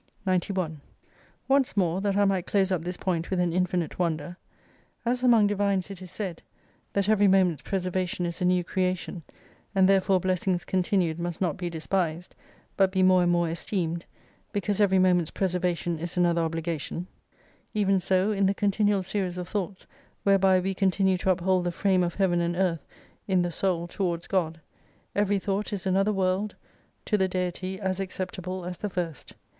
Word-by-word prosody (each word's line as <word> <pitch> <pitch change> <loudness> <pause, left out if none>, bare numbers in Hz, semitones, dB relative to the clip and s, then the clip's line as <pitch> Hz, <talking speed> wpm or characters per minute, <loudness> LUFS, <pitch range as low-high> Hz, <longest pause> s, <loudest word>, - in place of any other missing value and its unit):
91 180 -4 -1 0.7
Once 270 -4 +2
more, 180 -1 +1
that 200 -1 0
I 205 - +4
might 190 -2 0
close 195 -2 +2
up 180 -3 +1
this 180 +2 -4
point 170 -3 -2
with 185 - 0
an 175 -2 +1
infinite 180 -2 -1
wonder: 170 0 -1 0.7
As 245 +1 0
among 235 -4 +5
divines, 200 -1 0
it 190 -2 -9
is 185 - -9
said, 185 -3 -5 0.5
That 200 -1 +1
every 210 -1 +4
moments 185 -6 +3
preservation 185 -2 -2
is 170 +2 -4
a - - +2
new 180 0 +3
creation: 185 -1 -2 0.5
and 190 -1 +5
therefore 195 -1 +4
blessings 185 0 0
continued 180 -3 0
mtist 175 -1 -3
not 175 -5 0
be 175 -1 -4
despised^ 170 +1 -2 0.5
but 195 -1 +3
be 190 -1 +2
more 185 -1 +5
and 175 0 +3
more 175 -1 +2
esteemed: 170 0 -2 0.5
because 205 0 -1
every 190 -2 +4
momenfs 180 -3 +3
preservation 180 -3 -1
is 170 +2 -4
another 170 -1 +3
obligation: 165 +1 -3 0.7
even 195 -2 +3
so 185 +3 +1
in 200 -2 +2
the 195 - +1
continual 205 -1 +2
series 185 -2 -2
of 180 -1 -4
thoughts 190 0 -4 0.4
whereby 195 -1 +4
we 190 +1 -1
continue 190 -1 +2
to 190 - 0
uphold 185 0 +2
the 175 - -1
frame 190 +1 +2
of 175 -1 -1
Heaven 180 -3 +2
and 170 0 -1
Earth 175 -3 0 0.4
in 185 -3 +3
the 175 - -2
Soul 175 -1 -1
towards 175 -2 -2
God, 165 -4 -1 0.5
every 205 0 +2
thought 195 +1 -2
is 200 -2 -4
another 195 +2 +2
world 195 +1 0 0.5
to 210 - +1
the 190 - +3
Deity 185 +1 -3
as 190 -1 -2
acceptable 185 -1 -4
as 180 -1 -6
the 210 - -3
first. 175 -5 -5
185 Hz, 175 wpm, -27 LUFS, 175-195 Hz, 0.7 s, among